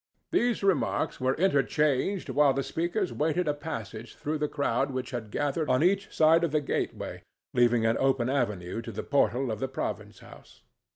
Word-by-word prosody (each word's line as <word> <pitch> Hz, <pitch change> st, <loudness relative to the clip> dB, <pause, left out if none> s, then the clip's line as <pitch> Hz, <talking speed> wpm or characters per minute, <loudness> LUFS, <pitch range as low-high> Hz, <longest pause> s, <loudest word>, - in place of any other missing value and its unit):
These 240 Hz, -4 st, +1 dB
remarks 175 Hz, -12 st, 0 dB
were 130 Hz, +1 st, +1 dB
interchanged 150 Hz, +1 st, +1 dB
while 145 Hz, -2 st, +4 dB
the 135 Hz, -, -1 dB
speakers 175 Hz, +6 st, -2 dB
waited 160 Hz, +3 st, 0 dB
a 150 Hz, -, +2 dB
passage 115 Hz, -6 st, -7 dB
through 155 Hz, +1 st, -3 dB
the 150 Hz, -, 0 dB
crowd 140 Hz, -3 st, 0 dB
which 130 Hz, 0 st, -4 dB
had 120 Hz, -4 st, -5 dB
gathered 145 Hz, +6 st, -1 dB
on 130 Hz, +4 st, +3 dB
each 195 Hz, +2 st, +1 dB
side 160 Hz, +2 st, +4 dB
of 170 Hz, -, +1 dB
the 155 Hz, -, +2 dB
gateway, 145 Hz, -, -3 dB, 0.3 s
leaving 120 Hz, -2 st, +3 dB
an 115 Hz, 0 st, +2 dB
open 135 Hz, -3 st, +2 dB
avenue 115 Hz, -7 st, -1 dB
to -, -, -7 dB
the -, -, -5 dB
portal 135 Hz, -3 st, +1 dB
of 110 Hz, -, -4 dB
the 135 Hz, -, -1 dB
province 130 Hz, -, -5 dB
house. -, -, -16 dB
140 Hz, 180 wpm, -28 LUFS, 125-160 Hz, 0.3 s, while